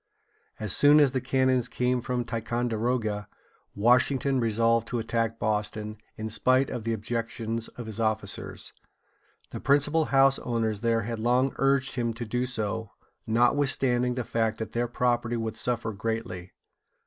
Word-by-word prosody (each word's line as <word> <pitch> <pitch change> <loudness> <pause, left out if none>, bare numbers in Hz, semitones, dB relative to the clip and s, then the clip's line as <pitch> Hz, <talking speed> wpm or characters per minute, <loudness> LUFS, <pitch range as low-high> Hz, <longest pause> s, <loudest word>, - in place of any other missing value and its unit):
As 105 -3 0
soon 145 +1 +6
as 145 -3 +5
the 130 0 -1
cannons 130 -2 +2
came 125 0 0
from 125 0 -2
Ticonderoga, 115 -2 -1 0.5
Washington 130 +4 +3
resolved 115 0 +2
to 120 - -2
attack 115 0 -1
Boston, 105 0 -2 0.2
in 110 0 -5
spite 130 +4 +2
of 115 - -5
the 115 - 0
objections 115 0 -3
of 120 - -6
his 110 0 -5
officers. 110 -2 -2 0.8
The - - -5
principal 145 +3 +2
house 135 -1 +4
owners 110 -3 -1
there 115 -1 +2
had 115 +1 -4
long 125 +4 +2
urged 135 0 +2
him 115 -3 -1
to 120 0 -5
do 125 +3 -1
so, 110 -2 -3 0.4
notwithstanding 125 +1 +2
the 125 - -2
fact 110 -1 -1
that 110 -1 -5
their 120 +1 -1
property 120 -1 0
would 115 -1 -3
suffer 120 -2 -2
greatly. 105 -4 -4
115 Hz, 150 wpm, -27 LUFS, 110-125 Hz, 0.8 s, soon